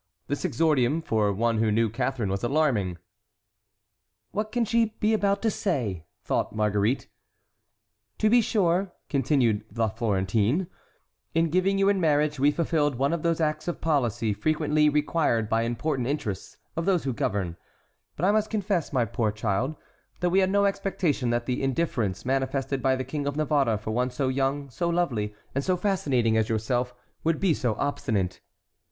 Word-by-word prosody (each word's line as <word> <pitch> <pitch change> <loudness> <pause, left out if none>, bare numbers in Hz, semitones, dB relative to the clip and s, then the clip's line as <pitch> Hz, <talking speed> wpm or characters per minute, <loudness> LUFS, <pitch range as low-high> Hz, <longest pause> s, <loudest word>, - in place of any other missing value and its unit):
This 145 - -3
exordium 155 -1 +2
for 105 -5 +1
one 115 +2 +1
who 110 -1 +2
knew 115 +2 +3
Catharine 115 -1 -2
was 95 0 -2
alarming. 120 - +1 1.3
"What 215 +1 -2
can 240 0 +1
she 225 0 +1
be 215 +1 +2
about 200 -1 +1
to 220 - +2
say?" 115 - -2 0.2
thought - - -1
Marguerite. 105 +3 +1 1.1
"To 215 - +2
be 240 +2 +5
sure," 190 -4 +1 0.2
continued 125 -6 +2
La 115 -1 +2
Florentine, 110 - 0 0.7
"in 165 -1 +2
giving 185 +3 +2
you 195 0 +3
in 200 -2 +2
marriage 150 -2 +2
we 140 +2 +5
fulfilled 150 -2 +1
one 140 +5 +1
of 170 - -1
those 165 0 +1
acts 155 0 -1
of 175 - -2
policy 120 -8 0
frequently 150 +6 +2
required 150 -6 +1
by 115 +1 +1
important 120 +3 -1
interests 110 -9 -4 0.2
of 165 +1 -2
those 185 -4 +2
who 135 - -1
govern; 95 -5 -2 0.6
but 170 - -1
I 200 - +5
must 215 0 +1
confess, 200 -6 -1
my 125 -4 +2
poor 110 0 -1
child, 110 +7 -1 0.4
that 180 0 +1
we 190 - +4
had 190 -1 +3
no 200 +1 +3
expectation 190 -10 0
that 120 0 0
the 125 0 -1
indifference 120 - -1
manifested 135 +1 -1
by 130 0 +3
the 130 - -3
King 140 +2 -4
of 145 - -2
Navarre 145 -7 +2
for 105 +1 -5
one 125 +3 0
so 130 +1 -1
young, 135 +1 -1
so 170 +9 -1
lovely, 120 -12 -1 0.2
and 140 - -1
so 185 +3 +1
fascinating 135 - +1
as 110 +1 +1
yourself 120 +3 0 0.3
would 165 -1 +1
be 190 -4 +3
so 120 -7 -1
obstinate." 105 -9 -1
140 Hz, 170 wpm, -26 LUFS, 115-170 Hz, 1.3 s, be